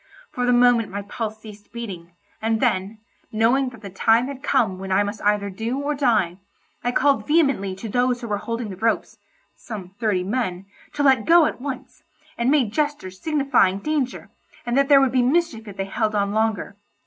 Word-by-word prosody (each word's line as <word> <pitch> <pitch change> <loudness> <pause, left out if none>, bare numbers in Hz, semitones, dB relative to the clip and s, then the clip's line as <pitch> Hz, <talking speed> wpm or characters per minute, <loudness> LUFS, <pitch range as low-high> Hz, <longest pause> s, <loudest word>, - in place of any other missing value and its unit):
For 250 -4 -2
the - - +4
moment 245 -2 +4
my 200 +1 -5
pulse 215 +1 -5
ceased 210 -1 -13
beating, 185 -8 -7 0.3
and 225 0 0
then, 190 +3 0 0.3
knowing 240 +5 +2
that 230 -4 -14
the 200 - -7
time 225 +5 +3
had 270 -1 -7
come 230 -10 +1
when 190 0 -6
I 195 +2 +3
must 205 +1 -5
either 205 -1 +1
do 225 +7 -3
or 285 +1 -1
die, 215 -11 +1 0.4
I 245 - +1
called 280 +2 +2
vehemently 275 - +2
to 195 +4 -7
those 245 +3 +1
who 240 - -6
were 205 -2 -1
holding 230 +1 -4
the 185 - -8
ropes 225 +3 -1 0.4
(some 200 -6 -8
thirty 205 -5 +1
men) 190 -3 -2 0.3
to 290 - -1
let 265 -5 +4
go 335 -1 +7
at 250 - -3
once, 270 -2 -7 0.3
and 235 +2 0
made 265 -7 +2
gestures 290 -12 -2
signifying 275 -11 +2
danger, 280 +2 -3 0.3
and 240 0 -1
that 275 +1 +3
there 280 -1 +7
would 270 -2 +2
be 255 0 +3
mischief 255 -4 0
if 200 -1 -10
they 195 - -2
held 215 +2 -1
on 200 -1 +1
longer. 215 -2 -1
225 Hz, 195 wpm, -22 LUFS, 200-265 Hz, 0.4 s, go